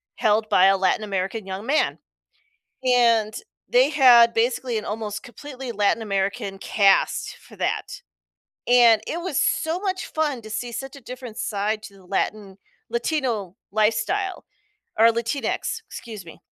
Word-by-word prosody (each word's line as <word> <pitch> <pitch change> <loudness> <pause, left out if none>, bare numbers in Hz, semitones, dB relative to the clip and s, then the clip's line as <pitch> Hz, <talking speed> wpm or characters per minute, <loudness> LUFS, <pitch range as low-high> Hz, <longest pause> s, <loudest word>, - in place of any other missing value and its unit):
held 215 +1 +2
by 185 - +5
a 195 0 +5
Latin 190 +3 +1
American 195 +1 -3
young 190 +2 -6
man. 290 +5 +1 0.9
And 230 -4 +3 0.3
they 255 +4 +4
had 245 -5 +6
basically 240 0 0
an 215 - -6
almost 210 -1 -4
completely 260 0 -9
Latin 210 +2 +1
American 195 -1 -2
cast 200 -1 +2
for - - -17
that. - - -3 0.6
And 240 -3 +6
it 340 - -3
was 345 -6 -1
so 320 +2 0
much 375 -1 -3
fun 295 -6 -2
to 215 - -11
see 235 +2 -4
such 270 +4 -6
a - - -12
different 250 -2 -9
side 215 0 -2
to 200 - -11
the 195 -1 -18
Latin 200 +1 -3 0.3
Latino 235 - -2
lifestyle 350 - 0 0.5
or 225 +1 +7
Latinx. 270 - -2
Excuse 215 -6 -9
me. 165 - -13
225 Hz, 145 wpm, -23 LUFS, 205-255 Hz, 0.9 s, or